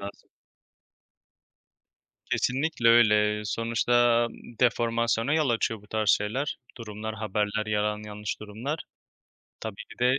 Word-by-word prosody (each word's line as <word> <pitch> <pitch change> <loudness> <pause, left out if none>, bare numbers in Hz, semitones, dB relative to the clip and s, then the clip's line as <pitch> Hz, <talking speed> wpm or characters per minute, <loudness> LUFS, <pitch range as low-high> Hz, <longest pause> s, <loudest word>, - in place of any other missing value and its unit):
lazım. 100 0 -10 2.0
Kesinlikle, 130 -1 +1
öyle. 105 -2 +4
Sonuçta, 120 +1 +2 0.3
deformasyona 115 +1 +1
yol 155 -4 +2
açıyor 115 -2 0
bu 105 - -19
tarz 110 -1 -1
şeyler, 125 +8 +1 0.2
durumlar, 110 -1 -6
haberler, 105 0 -1
yalan 105 0 -1
yanlış 105 -1 -5
durumlar. 115 +9 -5 0.8
Tabii, 110 -3 -5 0.2
bir - - -13
de 125 +2 +3
110 Hz, 105 wpm, -27 LUFS, 105-120 Hz, 2.0 s, öyle